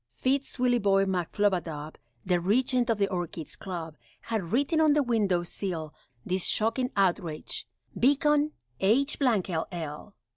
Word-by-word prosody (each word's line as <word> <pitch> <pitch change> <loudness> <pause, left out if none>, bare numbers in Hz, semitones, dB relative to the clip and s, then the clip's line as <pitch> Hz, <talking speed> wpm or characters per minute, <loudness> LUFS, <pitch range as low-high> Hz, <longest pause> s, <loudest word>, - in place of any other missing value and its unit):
Fitz 275 +2 -1
Willieboy 205 -6 +3
McFlubadub, 175 -4 -1 0.3
The 180 -1 +2
Regent 245 +6 +2
of 225 - +2
the 200 -1 +2
Orchids' 175 -4 -4
Club, 165 -5 -6 0.2
Had 205 -7 -3
written 285 +6 +2
on 310 -2 +5
the 295 -1 +3
window 205 -8 +1
sill, 170 -4 -4 0.3
This 185 0 -1
shocking 230 +4 +1
outrage 175 -5 0 0.3
"Beacon 295 +3 +3 0.3
H 260 +9 +2
ll!" 175 - -1
200 Hz, 120 wpm, -28 LUFS, 175-250 Hz, 0.3 s, on